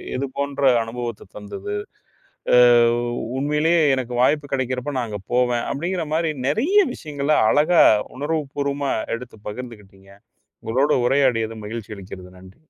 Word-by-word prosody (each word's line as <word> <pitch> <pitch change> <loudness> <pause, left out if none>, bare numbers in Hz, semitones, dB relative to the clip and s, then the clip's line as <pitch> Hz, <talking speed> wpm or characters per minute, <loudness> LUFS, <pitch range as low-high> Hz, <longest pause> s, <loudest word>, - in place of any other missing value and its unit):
எதுபோன்ற 140 +1 -3 0.2
அனுபவத்தைத் 115 -3 -7
தந்தது. 105 - -6 0.8
அ - - +7 0.8
உண்மையிலேயே 150 +4 +2 0.2
எனக்கு 125 -1 -4
வாய்ப்பு 145 +2 +2
கிடைக்கிறப்ப 130 +1 -2
நாங்க 110 -4 -4
போவேன் 125 -1 +1
அப்படிங்கிற 175 +4 -2
மாரி, 165 -1 +1 0.2
நிறைய 295 - +2 0.2
விஷயங்களை 150 -1 -1
அழகா, 155 +4 +5 0.3
உணர்வுப்பூர்வமா 140 -1 -2 0.2
எடுத்து 120 -2 -12
பகிர்ந்துகிட்டீங்க. 105 -4 -10 0.5
உங்களோடு 130 +7 +2
உரையாடியது 120 -5 +1
மகிழ்ச்சி 110 0 -6
அளிக்கிறது, 95 -1 -10
நன்றி. 95 +5 -16
130 Hz, 110 wpm, -22 LUFS, 115-145 Hz, 0.8 s, அ